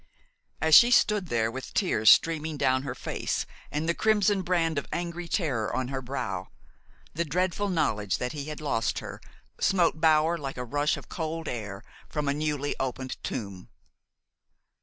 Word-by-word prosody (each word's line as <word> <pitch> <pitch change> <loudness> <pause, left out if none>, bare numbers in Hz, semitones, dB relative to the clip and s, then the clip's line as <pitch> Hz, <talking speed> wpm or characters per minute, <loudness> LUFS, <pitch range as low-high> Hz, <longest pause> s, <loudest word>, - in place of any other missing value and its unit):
As 160 0 +1
she 240 +9 +10
stood 210 -5 +3
there, 115 -5 0
with 130 +2 -8
tears 110 - +3
streaming 160 - +4
down 130 -1 +2
her 140 - -5
face - - -3 0.3
and 150 +2 -2
the 170 - +2
crimson 205 -1 +2
brand 165 -4 +1
of - - -9
angry 170 0 -4
terror 140 - -1
on 130 -1 -1
her 135 -1 -3
brow, 120 -8 -4 0.7
the 170 - 0
dreadful 180 +5 -1
knowledge 105 - 0
that 125 0 -3
he 145 -2 -5
had 150 0 -6
lost 115 -7 0
her - - -7 0.4
smote 170 -4 +2
Bower 160 +1 +4
like 135 -3 -5
a 125 - -4
rush 145 +5 0
of - - -11
cold 160 -1 -4
air 105 -4 -5 0.3
from 150 -2 -2
a 140 - +2
newly 150 -1 -2
opened 130 0 -4
tomb. 100 -6 -5
150 Hz, 165 wpm, -27 LUFS, 125-170 Hz, 0.7 s, she